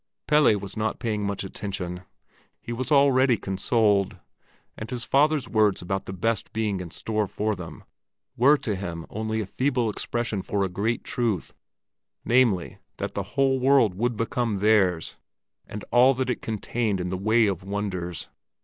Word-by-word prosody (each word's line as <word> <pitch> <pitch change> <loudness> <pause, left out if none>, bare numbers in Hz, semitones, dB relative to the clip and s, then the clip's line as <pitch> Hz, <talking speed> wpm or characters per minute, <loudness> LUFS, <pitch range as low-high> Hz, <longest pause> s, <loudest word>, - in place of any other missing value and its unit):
Pelle 150 -8 +4
was 100 0 -6
not 110 0 -1
paying 105 -4 -2
much 100 -1 -3
attention. 95 -2 -5 0.6
He 120 - -6
was 130 +6 -3
already 135 -3 +5
consoled, 100 0 +1 0.6
and 110 - -7
his 120 -1 -3
father's 150 0 +2
words 105 -3 +2
about 95 +2 -3
the - - -4
best 110 +3 -1
being 105 -3 -1
in 90 -2 -6
store 105 +4 -2
for 105 +3 -1
them, 90 -3 -9 0.5
were 140 +5 +5
to 110 -7 -2
him 85 -4 -5
only 110 +1 -2
a - - -3
feeble 125 +1 0
expression 115 -1 -2
for 100 +1 -1
a 95 - -1
great 105 +6 -1
truth, 115 -8 -2 0.7
namely, 115 -8 +2 0.2
that - - -4
the 100 - -2 0.2
whole 135 -1 +3
world 130 -6 +4
would 115 +4 -1
become 115 -1 -1
theirs, 95 -5 +2 0.5
with 105 - -6
all 125 +2 +6
that 130 0 -1
it - - -4
contained 110 -1 -2
in 90 0 -3
the 95 - -2
way 110 +4 +3
of 95 -4 -2
wonders. 95 -4 -4
110 Hz, 165 wpm, -25 LUFS, 95-120 Hz, 0.7 s, all